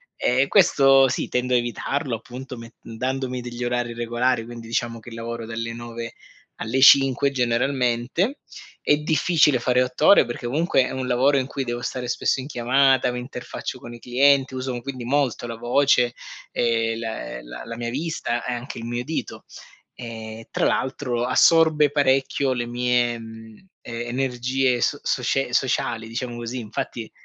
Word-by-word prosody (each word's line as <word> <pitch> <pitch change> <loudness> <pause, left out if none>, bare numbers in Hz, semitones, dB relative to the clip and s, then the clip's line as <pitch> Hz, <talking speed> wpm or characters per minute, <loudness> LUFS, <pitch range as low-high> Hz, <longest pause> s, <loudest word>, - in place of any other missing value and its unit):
Ehm, 130 +3 +2
questo 135 -8 +5
sì, - - -2
tendo 125 0 0
a - - +5
evitarlo 120 +2 -2
appunto 125 +3 -9
met 115 0 -11
dandomi 130 +2 -3
degli 120 0 -6
orari 120 -1 -1
regolari, 120 0 0
quindi 120 -1 -9
diciamo 115 0 -2
che 115 +2 -12
lavoro 115 0 -5
dalle 115 0 -4
9 115 0 -7 0.5
alle 125 +4 -1
5 135 0 +6
generalmente. 125 - 0 0.4
È 145 - +3
difficile 150 -3 +3
fare 125 +1 +2
8 125 +4 -2
ore 200 - +7
perché 120 0 -6
comunque 140 0 +2
è - - -5
un 130 -1 -3
lavoro 135 +3 +3
in 130 0 0
cui 135 -1 -3
devo 120 0 -3
stare 125 -1 -4
spesso 125 - 0
in 130 - -5
chiamata, 130 0 +3
mi 125 - -5
interfaccio 125 0 -6
con 120 - -10
i 120 - -10
clienti, 135 +2 +3
uso 130 -1 -3
quindi 130 -1 -6
molto 130 -2 0
la 115 -1 -6
voce, 125 0 +2 0.4
ehm, 115 -1 0
la 110 - -5
la - - -9
la 115 0 -7
mia 120 0 -3
vista 140 -3 -3
e 125 - -2
anche 120 +1 -6
il 115 - -6
mio 120 +1 -3
udito. 160 +5 -5 0.5
Ehm, 115 -2 -8
tra - - 0
l'altro 125 -2 -1
assorbe 155 +2 +5
parecchio 135 -1 +2
le 120 -1 -3
mie, 120 -1 +1
mhmm, 110 - -12
e 120 0 -6
energie 130 0 0
so 145 - +1
socie 125 0 0
sociali, 115 -3 0
diciamo 120 +1 -5
così, 120 +2 -5
infatti, 110 +1 -5
125 Hz, 165 wpm, -23 LUFS, 120-135 Hz, 0.5 s, ore